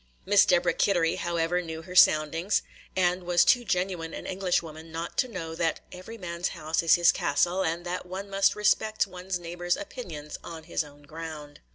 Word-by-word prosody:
Miss 205 +1 +6
Deborah 175 -1 +3
Kittery, 175 -4 +2
however, 170 +1 0
knew 160 -1 -7
her 180 +1 -10
soundings, 165 +3 +4 0.3
and 180 0 +2
was 175 -1 +3
too 245 - +4
genuine 180 -5 -2
an - - -7
Englishwoman 165 -4 -2
not 165 +1 -5
to 255 - +3
know 175 -8 -6
that 165 -1 -1
"every 185 +6 -9
man's 170 -3 -3
house 155 +1 -2
is 165 -1 +5
his 175 -1 +5
castle," 175 +6 +1
and 170 +2 -2
that 180 +1 -4
one 190 +2 -6
must 195 0 +2
respect 215 +1 +2
one's 185 0 -5
neighbor's 175 0 -2
opinions 175 - -7
on 165 -1 -8
his 155 - -2
own 145 0 -16
ground. 150 -1 -8
175 Hz, 180 wpm, -27 LUFS, 165-185 Hz, 0.3 s, Miss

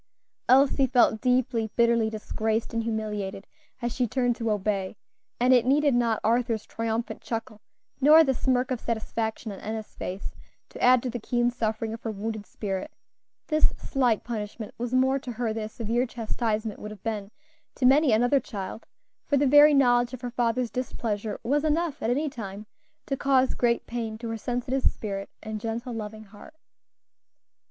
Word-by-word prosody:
Elsie 270 +1 +5
felt 240 -3 +3
deeply, 250 -3 +1
bitterly 235 -2 +3
disgraced 220 +1 -2
and 230 - 0
humiliated 210 -3 -3 0.4
as 240 -1 -1
she 250 -2 0
turned 245 +1 +1
to 230 -1 -2
obey; 205 -1 -1 0.4
and 250 +2 +5
it 245 -2 +5
needed 285 +2 +3
not 235 -2 +2
Arthur's 230 -1 +1
triumphant 225 +1 -3
chuckle 225 -2 -5 0.4
nor 310 +4 +8
the 270 -3 +1
smirk 255 0 0
of 250 - -1
satisfaction 220 -1 -3
on 195 - -8
Enna's 220 0 -6
face 185 +2 -6 0.4
to - - -10
add 250 -1 +5
to 255 - -2
the 245 - -4
keen 240 +2 +1
suffering 220 -2 -2
of 225 - -7
her 225 - -4
wounded 215 0 -4
spirit; 200 +7 -4 0.6
this 310 -1 +2
slight 245 -6 +1
punishment 215 -2 -5
was 240 0 -3
more 260 +1 +3
to 250 -2 -6
her 230 -1 -2
than 220 -1 -3
a - - -7
severe 235 +3 -1
chastisement 220 -2 -2
would 210 - -7
have 210 -3 -11
been 210 -3 -3 0.5
to 255 - 0
many 275 +1 +5
another 245 +5 +4
child; 205 -4 -7 0.4
for 285 - +2
the 285 - +3
very 290 +2 +8
knowledge 245 -2 +3
of 250 - -13
her 245 -1 -4
father's 240 0 0
displeasure 220 -4 -3
was 285 +5 +1
enough 315 0 0
at 225 - 0
any 285 +6 +1
time 210 -6 -7 0.4
to 275 - -1
cause 265 -1 +2
great 235 -1 +1
pain 230 -2 -4
to 230 0 -6
her 225 - -3
sensitive 245 +3 -2
spirit 195 -5 -2
and 215 -1 -5
gentle, 235 +3 -4
loving 215 -1 -6
heart. 215 +9 -15
235 Hz, 175 wpm, -27 LUFS, 220-255 Hz, 0.6 s, nor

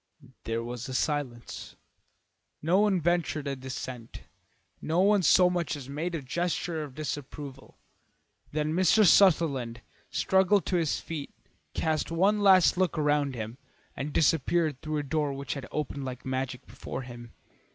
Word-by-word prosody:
There 115 0 -2
was 120 +1 -6
a 130 - -4
silence; 130 -5 -3 0.8
no 170 +5 +2
one 205 -3 +3
ventured 165 -3 0
a 140 - -2
dissent, 130 -2 -7 0.6
no 160 +3 0
one 205 +1 +4
so 180 +1 +6
much 175 -3 -1
as 140 -3 -8
made 165 +5 -3
a 150 - -4
gesture 170 +3 -2
of 145 -4 -8
disapproval. 140 -2 -7 0.7
Then 150 +1 -1
Mr. 185 +5 +4
Sutherland 145 - +4 0.3
struggled 190 +1 +3
to 180 - +1
his 165 -4 0
feet, 155 -4 -6 0.5
cast 155 -1 0
one 195 +6 +2
last 190 -3 +6
look 185 -4 +1
around 145 -3 +1
him, 115 +2 -6 0.4
and 145 +2 -4
disappeared 155 -1 +2
through 155 -1 -3
a 145 - -1
door 145 0 -1
which 140 0 -4
had 140 -3 -7
opened 150 -2 -3
like 130 -1 -6
magic 130 0 -3
before 130 - -7
him. 120 -2 -10
150 Hz, 150 wpm, -28 LUFS, 130-175 Hz, 0.8 s, so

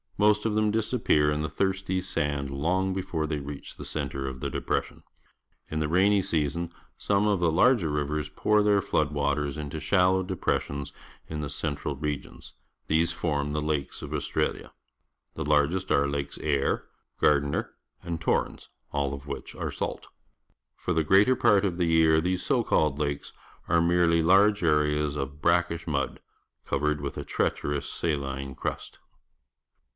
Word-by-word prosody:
Most 105 +1 +3
of 110 - -1
them 110 0 +2
disappear 105 -9 +2
in 75 0 -1
the 75 - -2
thirsty 95 -1 -1
sand 75 -6 -2
long 90 +7 0
before 90 -4 -2
they 75 -1 -2
reach 70 0 -8
the - - -9
centre 70 0 -3
of 65 -1 -5
the - - -3
depression. - - -2 0.7
In 80 - -2
the 75 - 0
rainy 95 +5 +4
season 80 +2 -1 0.3
some 100 +1 +1
of 100 -3 +2
the 85 -2 +2
larger 95 0 +4
rivers 75 0 -2
pour 105 +7 +2
their 105 -1 +4
flood 75 -6 0
waters 70 0 -1
into 75 +1 -5
shallow 90 +4 +3
depressions 70 -6 -2 0.4
in 75 -1 -4
the 75 - -4
central 70 -1 -3
regions. 75 0 -5 0.3
These 80 +2 +2
form 75 -3 -1
the 75 0 -1
lakes 75 -2 -2
of - - -6
Australia. - - -2 0.6
The - - -3
largest 75 +5 +2
are 70 0 +3
Lakes 70 0 -3
Eyre, 70 -3 0 0.3
Gairdner, 70 -1 +2 0.3
and 85 -2 -4
Torrens, - - -1 0.2
all 70 -1 -1
of 70 0 -11
which 70 - -6
are - - -3
salt. - - -4 0.7
For 90 - -2
the 80 -1 +2
greater 100 +10 +5
part 105 -4 +4
of 90 -3 -1
the 90 - +1
year 80 -1 +4
these 90 +2 -1
so 125 -4 +2
called 75 -9 +2
lakes 70 -1 -2 0.3
are 85 0 +3
merely 85 -1 +3
large 100 +3 +5
areas 75 -2 +2
of 70 +1 -5
brackish 85 0 +1
mud, 70 -3 -1 0.5
covered 75 0 0
with 70 - -5
a - - -4
treacherous 70 0 -1
saline 70 -4 -3
crust. - - -5
80 Hz, 160 wpm, -27 LUFS, 70-90 Hz, 0.7 s, greater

